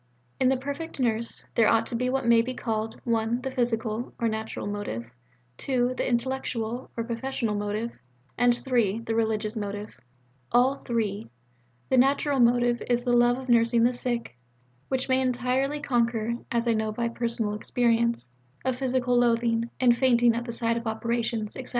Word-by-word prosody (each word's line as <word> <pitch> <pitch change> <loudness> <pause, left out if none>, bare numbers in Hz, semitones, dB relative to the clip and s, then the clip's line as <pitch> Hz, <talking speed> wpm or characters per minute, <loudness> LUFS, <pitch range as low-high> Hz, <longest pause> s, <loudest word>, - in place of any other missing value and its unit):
In 255 - +4
the 265 - +2
perfect 285 +4 -6
nurse, 235 -2 -1
there 225 -2 +4
ought 225 +1 +3
to 235 - -5
be 250 +2 0
what 265 0 -1
may 235 -1 +6
be 255 +2 -4
called 225 -1 -3
(1) 230 +1 0
the 265 +1 -4
physical 235 -2 -1
(or 235 - +1
natural) 220 0 -3
motive, 205 - -4 0.5
(2) 250 -2 0
the 255 - -2
intellectual 240 -1 -2
(or 230 - 0
professional) 235 -1 -2
motive, 210 +3 -2 0.4
and 245 0 +3
(3) 230 -5 +1
the 225 -1 -3
religious 220 -1 0
motive 205 0 -5 0.6
all 255 +3 +4
three. 210 - -2 0.6
The 260 - +3
natural 275 +1 +3
motive 240 0 +3
is 240 0 +1
the 245 -1 +3
love 240 +1 +4
of 260 0 -8
nursing 235 -1 +4
the 245 +1 +3
sick, 240 - -3 0.5
which 260 -1 -1
may 260 0 +2
entirely 255 +3 0
conquer 235 -4 0 0.2
(as 235 0 0
I 230 - +4
know 220 -1 -1
by 235 +2 -1
personal 230 -2 -2
experience) 235 - 0 0.3
a 260 - +2
physical 250 -1 +1
loathing 230 -1 +2
and 245 -2 +5
fainting 240 -2 +4
at 235 +1 -3
the 235 - -4
sight 230 0 0
of 235 0 -4
operations, 225 -1 -2
etc. 260 - -7
235 Hz, 170 wpm, -26 LUFS, 225-250 Hz, 0.6 s, may